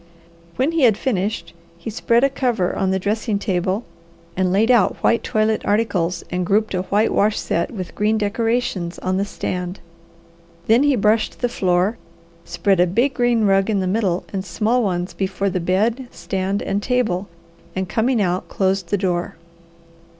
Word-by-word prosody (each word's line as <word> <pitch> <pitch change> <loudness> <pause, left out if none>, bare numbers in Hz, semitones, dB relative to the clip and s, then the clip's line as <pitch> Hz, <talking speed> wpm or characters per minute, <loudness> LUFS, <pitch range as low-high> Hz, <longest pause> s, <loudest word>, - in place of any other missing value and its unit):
When 265 +5 +1
he 330 -1 0
had 225 -6 +5
finished, 210 -3 -2 0.2
he 170 +6 -6
spread 235 +2 +2
a 275 - +5
cover 240 -9 0
on 190 - 0
the 190 - +1
dressing 210 +2 -1
table 190 +2 -1 0.5
and 185 -1 +1
laid 215 +6 +3
out 240 -3 +3
white 230 - +3
toilet 215 -1 +1
articles 195 -5 0
and 180 0 -1
grouped 205 +4 +1
a 180 - 0
white 205 +4 +1
wash 210 +1 +2
set 170 - -1
with 190 -7 -7
green 215 +1 +1
decorations 210 -4 -1
on 185 0 -1
the 200 - 0
stand. 180 -2 -4 0.9
Then 230 +3 +4
he 290 -1 +3
brushed 215 0 +1
the 245 - +2
floor, 185 0 +1 0.5
spread 190 +2 +1
a 180 - +5
big 240 +10 +1
green 240 -3 +2
rug 195 +1 +3
in 205 -2 +1
the 190 - -1
middle 185 -2 0
and 190 -1 -2
small 215 +7 0
ones 180 -4 -2
before 195 0 -1
the 185 - -1
bed, 215 +9 0
stand, 195 -1 -3
and 200 - -1
table, 210 -6 0 0.5
and 190 0 -2
coming 235 +5 +1
out 185 -2 -1
closed 190 -2 0
the 205 - +1
door. 180 -2 -1
200 Hz, 170 wpm, -20 LUFS, 185-225 Hz, 0.9 s, had